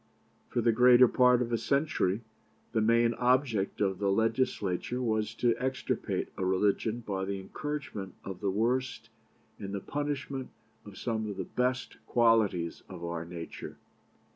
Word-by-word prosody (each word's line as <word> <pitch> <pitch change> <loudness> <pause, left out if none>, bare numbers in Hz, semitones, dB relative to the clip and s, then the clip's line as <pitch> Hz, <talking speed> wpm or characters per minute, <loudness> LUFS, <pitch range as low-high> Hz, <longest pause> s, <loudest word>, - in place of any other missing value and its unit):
For 120 - 0
the 115 0 +4
greater 125 +2 +7
part 125 0 +4
of 120 0 -4
a 115 - +2
century, 115 -6 +1 0.5
the 110 -1 +1
main 115 +1 +4
object 125 -6 +1
of 95 -2 +1
the 100 -1 +1
Legislature 110 0 0
was 110 -2 -1
to 120 0 +2
extirpate 130 +1 -2
a - - -2
religion 105 +5 +1
by 95 -2 -2
the 100 0 -3
encouragement 105 -3 -5
of 95 -2 -6
the 100 - 0
worst, 120 +6 -1 0.5
and 100 0 -5
the - - -2
punishment 140 +1 -3 0.4
of 100 - -11
some 110 -3 -2
of 100 - -6
the - - -2
best 125 0 -2
qualities 110 -8 +2
of 85 - -8
our 85 -1 -4
nature. 85 -1 -8
115 Hz, 150 wpm, -30 LUFS, 100-125 Hz, 0.5 s, greater